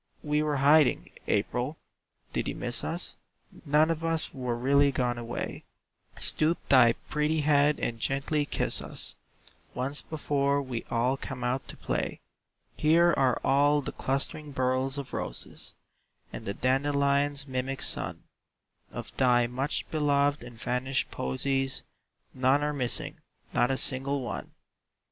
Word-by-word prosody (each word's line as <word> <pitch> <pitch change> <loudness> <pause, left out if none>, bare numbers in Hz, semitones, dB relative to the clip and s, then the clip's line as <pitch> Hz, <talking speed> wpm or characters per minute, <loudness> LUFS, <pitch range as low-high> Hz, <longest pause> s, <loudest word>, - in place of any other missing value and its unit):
"We 150 0 +1
were 150 -1 0
hiding, 145 0 +4 0.2
April. 125 +8 0 0.6
Did - - -1
you - - -3
miss - - -1
us? - - -2 0.5
None 150 +3 +4
of 165 0 -3
us 165 -1 -1
were 125 -3 -2
really 140 +3 +4
gone 125 -2 -1
away; 120 0 -5 0.6
Stoop 160 +2 +2
thy 125 -4 +7
pretty 150 +1 +1
head 145 0 +3
and 115 -1 -2
gently 140 +4 0
kiss - - 0
us - - -3 0.6
Once 135 +4 -1
before 140 -2 0
we 130 -4 -3
all 125 +3 +1
come 130 -2 -6
out 125 +2 -1
to - - -8
play. - - -2 0.6
"Here 170 +3 +4
are 130 -3 +2
all 145 +2 +4
the - - -4
clustering 145 +2 -2
burls 130 +1 0
of 140 -2 -6
roses, - - -5 0.6
And - - -7
the 100 - -2
dandelion's 140 +1 +2
mimic 130 0 -3
sun; - - -1 0.7
Of - - -8
thy 125 -2 +4
much 130 +4 -2
beloved 145 -3 +2
and 120 -2 -11
vanished 125 +3 -1
posies 135 - -1 0.5
None 130 +3 +3
are 150 0 0
missing, 125 -4 -1 0.3
not 120 - +3
a 135 - +1
single 135 +2 0
one!" 120 - -5
135 Hz, 140 wpm, -28 LUFS, 125-145 Hz, 0.7 s, thy